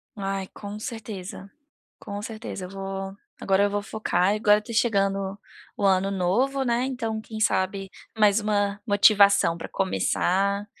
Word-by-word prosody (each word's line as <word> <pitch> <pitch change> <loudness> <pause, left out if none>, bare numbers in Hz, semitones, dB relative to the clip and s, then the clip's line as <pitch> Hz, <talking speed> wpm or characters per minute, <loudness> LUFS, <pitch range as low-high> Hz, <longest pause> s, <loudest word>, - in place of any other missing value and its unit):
Ai, 195 -1 -3
com 205 0 -7
certeza, 205 -4 -7 0.5
com 205 0 -6
certeza. 215 -3 -6
Eu - - -12
vou 195 0 -5 0.2
agora 195 0 +2
eu 205 - +1
vou 205 0 -1
focar 200 -3 0
e - - -1
agora 210 0 +4
tá 215 +2 -9
chegando 195 -3 +1 0.4
o - - -3
ano 195 0 +3
novo, 235 +9 +1
né, 240 0 +1
então, 230 -4 -3
quem 220 0 -8
sabe, 195 -2 0 0.3
mais 210 0 +4
uma 205 -1 0
motivação 200 -4 +5
para 170 - -7
começar, 195 +1 0
200 Hz, 150 wpm, -25 LUFS, 195-215 Hz, 0.5 s, motivação